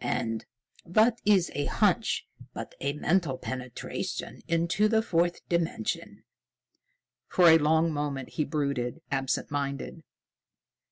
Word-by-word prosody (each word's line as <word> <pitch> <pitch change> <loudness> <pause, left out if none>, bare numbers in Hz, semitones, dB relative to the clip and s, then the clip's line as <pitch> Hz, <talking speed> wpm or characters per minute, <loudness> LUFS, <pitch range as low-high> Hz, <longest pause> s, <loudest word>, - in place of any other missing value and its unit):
And 115 -1 -2 0.4
what 220 +6 +3
is 195 -5 +4
a 145 0 -1
hunch - - +1 0.3
but - - -6
a 140 +1 -1
mental 155 -2 +1
penetration 130 -2 -5
into 170 +5 +2
the 220 0 +2
Fourth 175 -3 0
Dimension?" 170 -1 -2 1.0
For 175 -2 +6
a 160 0 +8
long 160 +2 +3
moment, 145 -3 -3
he 155 - -1
brooded, 140 -2 -2
absent 135 -1 -1
minded. 140 +3 -3
160 Hz, 115 wpm, -28 LUFS, 140-175 Hz, 1.0 s, a